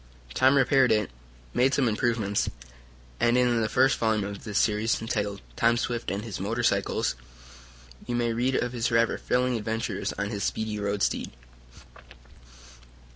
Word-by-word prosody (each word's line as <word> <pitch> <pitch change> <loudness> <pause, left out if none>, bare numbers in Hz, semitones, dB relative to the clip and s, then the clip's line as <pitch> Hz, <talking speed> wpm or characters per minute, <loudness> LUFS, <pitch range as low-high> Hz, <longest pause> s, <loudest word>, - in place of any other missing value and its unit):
Tom 135 - +4
repaired 135 -1 +4
it, 105 - +1 0.4
made 130 +2 +3
some 135 -3 +2
improvements, 110 -2 0 0.7
and, 120 +1 +3
in 120 -2 +2
the 110 - 0
first 130 +1 +3
volume 110 -2 +1
of 100 0 -8
this 105 -2 -2
series, 105 +1 +1
entitled 105 -3 -3
"Tom 115 0 +3
Swift 120 0 -2
and 100 +3 -3
His 110 -4 -6
Motor 115 +5 -2
cycle," 100 -4 +1 1.0
you 120 - -2
may 120 -1 0
read 125 +3 0
of 125 0 -1
his 120 -1 0
rather 115 -1 +2
thrilling 125 -1 0
adventures 110 -2 -3
on 100 +1 -3
his 100 -2 -3
speedy 110 -1 -2
road 100 -1 -1
steed. - - -1
115 Hz, 155 wpm, -27 LUFS, 105-120 Hz, 1.0 s, Tom